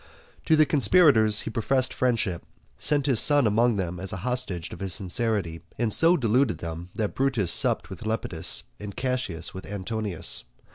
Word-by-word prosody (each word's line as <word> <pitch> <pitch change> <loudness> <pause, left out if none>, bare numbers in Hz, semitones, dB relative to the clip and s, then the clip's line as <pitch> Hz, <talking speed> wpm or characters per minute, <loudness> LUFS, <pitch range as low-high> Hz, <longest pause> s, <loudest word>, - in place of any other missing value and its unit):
To 160 - +4
the 155 0 +4
conspirators 135 - +4
he - - -6
professed 130 +3 0
friendship, 115 -9 -1 0.4
sent 145 -2 0
his 130 -6 +2
son 145 -3 +5
among 115 +2 +2
them 90 -3 -4
as 95 0 -2
a - - -5
hostage 125 -9 -2
of - - -10
his 95 -2 -1
sincerity, 95 -4 -1 0.2
and 115 -3 -1
so 170 +2 +5
deluded 125 -1 +1
them, 85 +1 -7
that 110 -2 -3
Brutus 125 -10 0
supped - - +1
with - - -9
Lepidus, 95 -6 0 0.2
and 105 -2 -8
Cassius 125 -10 -3
with 95 - -9
Antonius. 105 -2 -4
110 Hz, 165 wpm, -25 LUFS, 95-130 Hz, 0.4 s, son